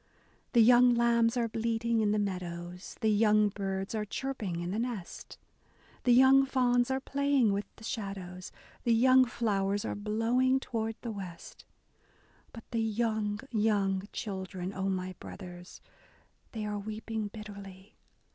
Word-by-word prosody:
The 235 Hz, -2 st, +7 dB
young 245 Hz, +1 st, +6 dB
lambs 235 Hz, 0 st, +3 dB
are 235 Hz, -1 st, +1 dB
bleating 230 Hz, +1 st, 0 dB
in 210 Hz, -1 st, +2 dB
the 210 Hz, -, +1 dB
meadows, 180 Hz, -2 st, -4 dB
The 220 Hz, -, +3 dB
young 210 Hz, 0 st, +4 dB
birds 195 Hz, 0 st, -4 dB
are 215 Hz, -1 st, -1 dB
chirping 210 Hz, -5 st, -4 dB
in 175 Hz, +1 st, -3 dB
the 210 Hz, -, -2 dB
nest, 230 Hz, -7 st, -5 dB, 0.7 s
The 250 Hz, -, +5 dB
young 265 Hz, +2 st, +7 dB
fawns 245 Hz, -2 st, +2 dB
are 265 Hz, 0 st, 0 dB
playing 275 Hz, -5 st, +2 dB
with 200 Hz, +1 st, -2 dB
the -, -, -16 dB
shadows. 190 Hz, -5 st, -5 dB, 0.3 s
The 235 Hz, -1 st, +3 dB
young 255 Hz, +2 st, +6 dB
flowers 205 Hz, -4 st, -1 dB
are -, -, -2 dB
blowing 230 Hz, +5 st, +1 dB
toward 225 Hz, -3 st, -3 dB
the 235 Hz, -, -3 dB
west 185 Hz, -5 st, -9 dB, 0.4 s
— -, -, -33 dB
But 230 Hz, -, -10 dB
the 230 Hz, -, 0 dB
young, 220 Hz, -1 st, -1 dB
young 205 Hz, -3 st, +1 dB
children, 190 Hz, -2 st, -5 dB
O 190 Hz, 0 st, -2 dB
my 185 Hz, -1 st, -2 dB
brothers. 180 Hz, -2 st, -10 dB, 0.7 s
They 220 Hz, -2 st, -4 dB
are 210 Hz, 0 st, -3 dB
weeping 215 Hz, +1 st, -4 dB
bitterly 200 Hz, -2 st, -10 dB
215 Hz, 145 wpm, -30 LUFS, 195-235 Hz, 0.7 s, The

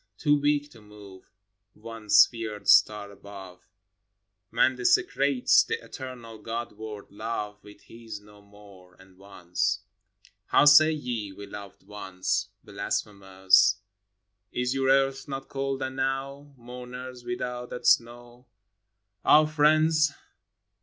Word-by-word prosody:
Too 145 Hz, -1 st, +2 dB
weak 145 Hz, 0 st, 0 dB
to 115 Hz, -, -16 dB
move 105 Hz, -2 st, -15 dB, 0.5 s
One 115 Hz, -1 st, -11 dB
sphered 110 Hz, -1 st, +3 dB
star 105 Hz, -1 st, +4 dB
above, 95 Hz, -3 st, -13 dB, 0.8 s
Man 130 Hz, -, +2 dB
desecrates 140 Hz, -, +3 dB
the -, -, -2 dB
eternal 120 Hz, -4 st, -10 dB
God 115 Hz, +2 st, -5 dB
word 105 Hz, -1 st, -10 dB
Love 105 Hz, -1 st, -5 dB
With 105 Hz, 0 st, -16 dB
his 115 Hz, -2 st, -10 dB
No 105 Hz, 0 st, -19 dB
More, 100 Hz, -3 st, -18 dB
and 95 Hz, 0 st, -21 dB
Once. 95 Hz, -3 st, -3 dB, 0.7 s
How -, -, +4 dB
say 155 Hz, +2 st, +7 dB
ye, 120 Hz, -9 st, -4 dB
"We 100 Hz, +1 st, -10 dB
loved 100 Hz, -1 st, -11 dB
once" 95 Hz, -1 st, -3 dB
Blasphemers? 95 Hz, -1 st, +1 dB, 0.8 s
Is 125 Hz, +1 st, -1 dB
your 135 Hz, 0 st, 0 dB
earth 135 Hz, +1 st, +2 dB
not 135 Hz, -1 st, -6 dB
cold 135 Hz, -1 st, -3 dB
enow, 135 Hz, +2 st, -4 dB
Mourners, 125 Hz, +1 st, -9 dB
without 120 Hz, 0 st, -5 dB
that 125 Hz, -, -8 dB
snow? 120 Hz, +1 st, 0 dB, 0.8 s
Ah, 155 Hz, +1 st, +6 dB
friends! 155 Hz, 0 st, +3 dB
115 Hz, 115 wpm, -26 LUFS, 100-135 Hz, 0.8 s, say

